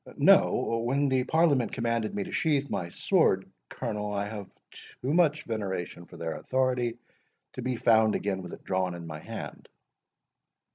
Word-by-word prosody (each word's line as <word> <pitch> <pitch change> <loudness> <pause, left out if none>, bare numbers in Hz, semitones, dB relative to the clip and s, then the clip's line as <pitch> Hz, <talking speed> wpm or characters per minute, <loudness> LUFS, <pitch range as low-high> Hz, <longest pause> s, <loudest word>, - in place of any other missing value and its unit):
No—when 125 +5 +3
the 130 -1 +2
Parliament 145 -8 +3
commanded 115 -2 -1
me 100 - -1
to - - -8
sheath 145 -3 +1
my 85 - -2
sword, - - +2 0.2
Colonel, 105 0 -3
I 100 0 -1
have 105 -2 -7 0.2
too 135 +4 -6
much 155 -3 +3
veneration 95 -5 -4
for - - -13
their 80 -1 -3
authority 125 -2 0 0.6
to - - -6
be 125 +1 -1
found 110 -2 +4
again 95 -1 -1
with 90 - -8
it - - -10
drawn 95 -2 -1
in 85 -1 -8
my 80 -2 -6
hand." - - -8
115 Hz, 155 wpm, -28 LUFS, 95-130 Hz, 0.6 s, found